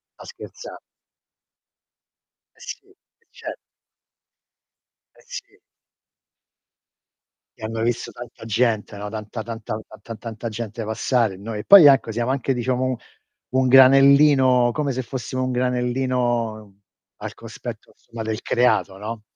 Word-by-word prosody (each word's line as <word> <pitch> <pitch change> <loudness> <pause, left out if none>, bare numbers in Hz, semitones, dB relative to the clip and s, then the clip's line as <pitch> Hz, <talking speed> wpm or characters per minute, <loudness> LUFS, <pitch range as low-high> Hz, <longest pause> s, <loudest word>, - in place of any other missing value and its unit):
sto - - -13
scherza 475 - -11 1.8
Eh - - -26
sì, 400 - -9
eh 435 +4 -32
cer - - -8 1.6
Eh, - - -21
sì. 410 -5 -10 2.0
E - - -14
hanno 110 +1 -4
visto 120 +1 -1
tanta 120 -1 -11
gente, 110 -2 0
no, 105 +1 -6
tanta 110 +1 -6
tanta 115 -1 -6 0.2
tan 115 +1 -8
tanta 115 +1 -7
gente 115 0 -6
passare 115 0 0
e - - -11
noi 105 +2 -6
e - - -5
poi 195 -5 +9
ecco 135 -5 +4
siamo 120 +3 -1
anche 135 0 0
diciamo 125 +1 -1 0.7
u 130 - +2
un 130 - +2
granellino, 135 -1 +6
come 145 +1 -2
se 130 0 -2
fossimo 130 +1 -4
un 130 - -1
granellino, 125 -4 -1 0.4
al - - -7
cospetto - - -9
insomma 115 -1 -9
del 110 +1 -3
creato, 105 -6 +1
no? 110 +2 -6
120 Hz, 130 wpm, -22 LUFS, 110-130 Hz, 2.0 s, poi